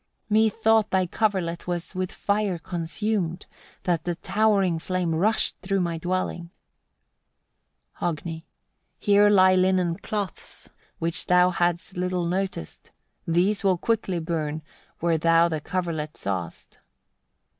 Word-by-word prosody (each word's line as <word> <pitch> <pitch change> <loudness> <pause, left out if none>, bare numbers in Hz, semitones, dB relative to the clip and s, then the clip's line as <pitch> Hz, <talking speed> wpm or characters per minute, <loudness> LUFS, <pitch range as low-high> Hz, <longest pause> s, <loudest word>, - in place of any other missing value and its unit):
15. 215 +1 +5
"Methought 220 0 +3
thy 190 -1 +2
coverlet 180 -4 -1
was 175 0 -3
with 185 -1 -2
fire 200 -3 0
consumed; 175 +2 -2 0.4
that 170 -3 0
the 175 -1 -2
towering 195 -3 +2
flame 180 -1 -1
rushed 210 +7 +1
through 195 0 0
my 170 -2 -1
dwelling." 175 -1 -2 1.5
Hogni. 170 -3 0
16. 160 +1 -7 0.5
"Here 205 0 +4
lie 185 -2 +6
linen 185 -2 +2
cloths, 205 -5 -5 0.3
which 165 +1 -2
thou 180 0 +5
hadst 175 +1 -1
little 180 -1 -1
noticed: 185 - -3 0.4
these 185 +6 +2
will 190 -2 +3
quickly 205 -2 0
burn 160 -2 -3 0.4
where 165 -1 +2
thou 165 +1 +4
the 160 -3 -3
coverlet 165 -4 -3
sawest." 95 -4 -5
180 Hz, 125 wpm, -25 LUFS, 170-195 Hz, 1.5 s, lie